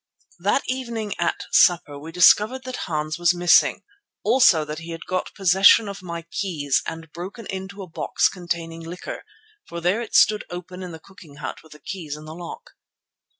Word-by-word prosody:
That -, -, +1 dB
evening 235 Hz, -5 st, -3 dB
at 170 Hz, -, 0 dB
supper 150 Hz, -5 st, +4 dB
we 160 Hz, +3 st, -9 dB
discovered 210 Hz, +9 st, +5 dB
that 255 Hz, 0 st, -5 dB
Hans 155 Hz, 0 st, -2 dB
was 175 Hz, 0 st, +3 dB
missing; 175 Hz, 0 st, +4 dB, 0.4 s
also 185 Hz, -12 st, +5 dB
that 150 Hz, +1 st, -6 dB
he 165 Hz, +1 st, -10 dB
had 165 Hz, 0 st, -7 dB
got 185 Hz, 0 st, -2 dB
possession 195 Hz, +3 st, +6 dB
of 200 Hz, -1 st, -7 dB
my 170 Hz, -2 st, -6 dB
keys 150 Hz, -8 st, 0 dB
and 160 Hz, -1 st, -7 dB
broken 190 Hz, +7 st, -8 dB
into 195 Hz, +1 st, -6 dB
a -, -, -10 dB
box 165 Hz, -, +1 dB
containing 170 Hz, -2 st, -5 dB
liquor, 170 Hz, +2 st, -7 dB, 0.4 s
for 170 Hz, -, -6 dB
there 180 Hz, +7 st, +1 dB
it 230 Hz, -, -6 dB
stood 210 Hz, 0 st, +5 dB
open 180 Hz, +1 st, -8 dB
in 180 Hz, -1 st, -6 dB
the 160 Hz, -, -9 dB
cooking 160 Hz, -4 st, -16 dB
hut 150 Hz, -, -6 dB
with 160 Hz, -, -16 dB
the 150 Hz, -, -15 dB
keys 155 Hz, -6 st, -6 dB
in 155 Hz, -, -12 dB
the 155 Hz, -, -8 dB
lock. 175 Hz, +1 st, -9 dB
175 Hz, 185 wpm, -23 LUFS, 165-195 Hz, 0.4 s, possession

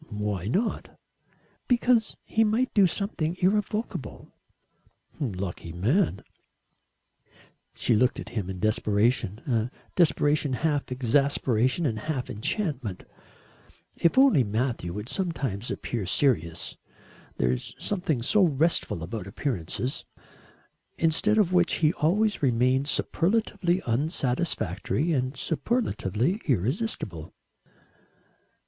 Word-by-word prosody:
"Why 105 Hz, -3 st, -3 dB
not?" 205 Hz, -, -2 dB, 0.7 s
"Because 240 Hz, -2 st, +2 dB
he 225 Hz, -, +2 dB
might 225 Hz, +4 st, +1 dB
do 200 Hz, -3 st, +6 dB
something 175 Hz, -3 st, -2 dB
irrevocable." 210 Hz, +4 st, -1 dB, 0.9 s
"Lucky 95 Hz, -, -4 dB
man." 115 Hz, -, +1 dB, 1.5 s
She 115 Hz, -, +2 dB
looked 125 Hz, +4 st, +2 dB
at -, -, -7 dB
him 105 Hz, -6 st, -3 dB
in 95 Hz, -1 st, -5 dB
desperation 110 Hz, 0 st, +1 dB
a 115 Hz, -3 st, 0 dB, 0.3 s
desperation 150 Hz, -4 st, +2 dB
half 145 Hz, 0 st, -1 dB
exasperation 130 Hz, +2 st, +1 dB
and 110 Hz, -6 st, -1 dB
half 135 Hz, +1 st, -3 dB
enchantment. 125 Hz, -, -3 dB, 0.9 s
If 170 Hz, -, +2 dB
only 265 Hz, -, +6 dB
Matthew 110 Hz, -4 st, -2 dB
would 105 Hz, +3 st, -5 dB
sometimes 135 Hz, -, -3 dB
appear 110 Hz, -6 st, -3 dB
serious 85 Hz, -, +1 dB, 0.6 s
there 60 Hz, 0 st, +2 dB
is 65 Hz, -, -4 dB
something 170 Hz, -, -1 dB
so 205 Hz, -, +4 dB
restful 155 Hz, -, +1 dB
about 100 Hz, +3 st, -5 dB
appearances. 120 Hz, -, -3 dB, 0.9 s
Instead 180 Hz, +7 st, +2 dB
of 190 Hz, -4 st, +3 dB
which 180 Hz, -1 st, +3 dB
he 155 Hz, 0 st, +2 dB
always 205 Hz, +8 st, +1 dB
remained 130 Hz, +1 st, +2 dB
superlatively 180 Hz, +3 st, +1 dB
unsatisfactory 130 Hz, -, -1 dB
and 130 Hz, -1 st, -1 dB
superlatively 170 Hz, -, -1 dB
irresistible. 115 Hz, -, -2 dB
135 Hz, 100 wpm, -27 LUFS, 110-175 Hz, 1.5 s, do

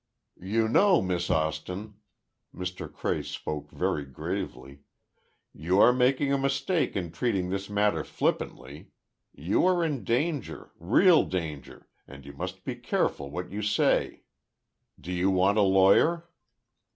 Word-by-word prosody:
"You 110 Hz, +5 st, 0 dB
know, 185 Hz, -, +4 dB
Miss 90 Hz, -2 st, -2 dB
Austin," 80 Hz, +7 st, -2 dB, 0.6 s
Mr. 90 Hz, 0 st, -6 dB
Cray -, -, -2 dB
spoke 75 Hz, -1 st, -6 dB
very 75 Hz, -, -2 dB
gravely, 70 Hz, 0 st, -6 dB, 0.7 s
"you 90 Hz, +6 st, 0 dB
are 125 Hz, -, +7 dB
making 130 Hz, +2 st, +2 dB
a 140 Hz, -, +1 dB
mistake 140 Hz, +6 st, 0 dB
in 90 Hz, -4 st, -3 dB
treating 95 Hz, -6 st, -1 dB
this 100 Hz, +1 st, -4 dB
matter 105 Hz, 0 st, +1 dB
flippantly. 70 Hz, +4 st, -3 dB, 0.4 s
You 80 Hz, +8 st, 0 dB
are 180 Hz, -2 st, +2 dB
in 150 Hz, -6 st, -2 dB
danger—real 145 Hz, -, +1 dB
danger, 80 Hz, -6 st, -6 dB, 0.2 s
and 70 Hz, 0 st, -13 dB
you 70 Hz, -, -10 dB
must 95 Hz, +5 st, -6 dB
be 125 Hz, +1 st, -5 dB
careful 70 Hz, -11 st, -1 dB
what 90 Hz, +5 st, -6 dB
you 105 Hz, +2 st, -4 dB
say. 105 Hz, 0 st, +1 dB, 0.8 s
Do 90 Hz, -, -7 dB
you 90 Hz, +2 st, +1 dB
want 95 Hz, +3 st, +2 dB
a -, -, +5 dB
lawyer?" 100 Hz, -, +4 dB
95 Hz, 130 wpm, -27 LUFS, 85-125 Hz, 0.8 s, are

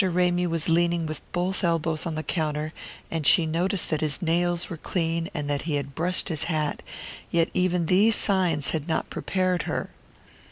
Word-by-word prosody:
Ramy 180 Hz, -1 st, +2 dB
was 165 Hz, -2 st, -1 dB
leaning 170 Hz, 0 st, +2 dB
with 155 Hz, -1 st, -3 dB
both 180 Hz, +2 st, -1 dB
elbows 165 Hz, -1 st, 0 dB
on 165 Hz, -, -3 dB
the 155 Hz, -, -3 dB
counter, 155 Hz, -2 st, -2 dB, 0.4 s
and 160 Hz, -3 st, 0 dB
she 170 Hz, -, +6 dB
noticed 175 Hz, +4 st, 0 dB
that 155 Hz, -, 0 dB
his 155 Hz, -2 st, 0 dB
nails 175 Hz, +1 st, 0 dB
were 170 Hz, -, -6 dB
clean 165 Hz, 0 st, -2 dB
and 145 Hz, -4 st, -4 dB
that 145 Hz, -1 st, 0 dB
he 150 Hz, -, +1 dB
had 140 Hz, -1 st, -3 dB
brushed 175 Hz, +6 st, 0 dB
his 160 Hz, -1 st, -1 dB
hat; 155 Hz, -3 st, -1 dB, 0.5 s
yet 165 Hz, -1 st, +1 dB
even 180 Hz, -2 st, +1 dB
these 205 Hz, +6 st, +5 dB
signs 175 Hz, -8 st, +2 dB
had 160 Hz, -1 st, -3 dB
not 160 Hz, -, -1 dB
prepared 185 Hz, -2 st, 0 dB
her! -, -, -3 dB
165 Hz, 185 wpm, -25 LUFS, 155-180 Hz, 0.5 s, she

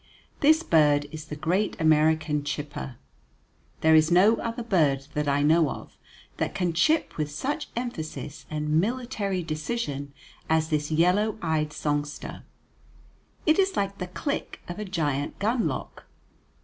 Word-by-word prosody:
This 315 Hz, +3 st, +5 dB
bird 150 Hz, -, +4 dB
is 155 Hz, -1 st, -7 dB
the 150 Hz, -, -6 dB
great 180 Hz, +8 st, 0 dB
American 155 Hz, -1 st, +3 dB
chipper. 145 Hz, -2 st, -5 dB, 0.9 s
There 160 Hz, 0 st, +5 dB
is 155 Hz, 0 st, +6 dB
no 195 Hz, +6 st, +5 dB
other 230 Hz, +1 st, -4 dB
bird 150 Hz, -11 st, +2 dB
that 150 Hz, 0 st, -1 dB
I 140 Hz, +1 st, +2 dB
know 160 Hz, 0 st, +4 dB
of -, -, -8 dB, 0.4 s
that -, -, -2 dB
can 180 Hz, -3 st, 0 dB
chip 310 Hz, -, +2 dB
with 150 Hz, -2 st, -1 dB
such 275 Hz, -, -3 dB
emphasis 160 Hz, -, -5 dB
and 150 Hz, +1 st, +1 dB
military 215 Hz, -5 st, -2 dB
decision 155 Hz, -3 st, -3 dB, 0.4 s
as 160 Hz, 0 st, +2 dB
this 150 Hz, -2 st, 0 dB
yellow 180 Hz, +7 st, +2 dB
eyed 155 Hz, -2 st, 0 dB
songster. 145 Hz, -1 st, -3 dB, 1.0 s
It 315 Hz, +3 st, +4 dB
is 385 Hz, 0 st, +2 dB
like 200 Hz, 0 st, -1 dB
the 180 Hz, -, -3 dB
click 280 Hz, +10 st, -4 dB
of 175 Hz, +3 st, -6 dB
a 210 Hz, -, -3 dB
giant 150 Hz, -7 st, -2 dB
gunlock. 225 Hz, +3 st, -2 dB
160 Hz, 140 wpm, -26 LUFS, 150-210 Hz, 1.0 s, is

